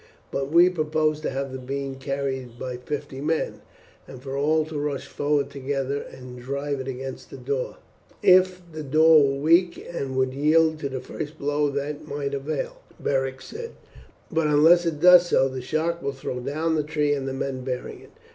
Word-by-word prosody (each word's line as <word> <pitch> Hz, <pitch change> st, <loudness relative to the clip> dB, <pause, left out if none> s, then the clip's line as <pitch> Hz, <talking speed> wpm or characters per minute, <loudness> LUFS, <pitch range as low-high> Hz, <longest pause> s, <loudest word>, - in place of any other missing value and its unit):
"But 135 Hz, 0 st, -2 dB
we 170 Hz, +2 st, +7 dB
propose 155 Hz, -3 st, 0 dB
to -, -, -1 dB
have 135 Hz, 0 st, -3 dB
the 130 Hz, -, -6 dB
beam 135 Hz, +1 st, -4 dB
carried 135 Hz, -2 st, -4 dB
by 125 Hz, 0 st, -5 dB
fifty 135 Hz, +1 st, -5 dB
men, 155 Hz, +2 st, -1 dB, 0.5 s
and 130 Hz, -, -10 dB
for 135 Hz, +1 st, -6 dB
all 155 Hz, +3 st, +2 dB
to 155 Hz, -1 st, -5 dB
rush 145 Hz, -2 st, -2 dB
forward 145 Hz, -1 st, 0 dB
together 140 Hz, 0 st, -2 dB
and 125 Hz, -1 st, -10 dB
drive 140 Hz, +2 st, -3 dB
it 130 Hz, -, -5 dB
against 130 Hz, 0 st, -6 dB
the -, -, -9 dB
door." 130 Hz, 0 st, -3 dB, 0.5 s
"If 185 Hz, 0 st, +5 dB
the 155 Hz, 0 st, -6 dB
door 155 Hz, +1 st, +6 dB
were 135 Hz, -, -1 dB
weak 170 Hz, +4 st, +4 dB, 0.2 s
and 135 Hz, -5 st, -3 dB
would 130 Hz, 0 st, +1 dB
yield 155 Hz, +3 st, +3 dB
to 140 Hz, -, -3 dB
the 130 Hz, -1 st, -4 dB
first 150 Hz, +1 st, -7 dB
blow 145 Hz, 0 st, 0 dB
that 145 Hz, +2 st, -4 dB
might 140 Hz, -1 st, -3 dB
avail," 140 Hz, +1 st, -3 dB, 0.2 s
Beric 135 Hz, -1 st, -1 dB
said; 465 Hz, +1 st, -8 dB, 0.6 s
"but 160 Hz, -1 st, +1 dB
unless 165 Hz, +4 st, +5 dB
it 155 Hz, -3 st, -2 dB
does 180 Hz, 0 st, +8 dB
so 135 Hz, -, +3 dB
the 130 Hz, -1 st, -5 dB
shock 160 Hz, +6 st, -1 dB
will 140 Hz, -, -2 dB
throw 130 Hz, -1 st, -5 dB
down 155 Hz, +6 st, -1 dB
the 155 Hz, -, +2 dB
tree 150 Hz, -1 st, 0 dB
and 135 Hz, -2 st, -2 dB
the 135 Hz, -, -2 dB
men 135 Hz, -1 st, -3 dB
bearing 125 Hz, -1 st, -5 dB
it. -, -, -16 dB
140 Hz, 190 wpm, -25 LUFS, 135-155 Hz, 0.6 s, does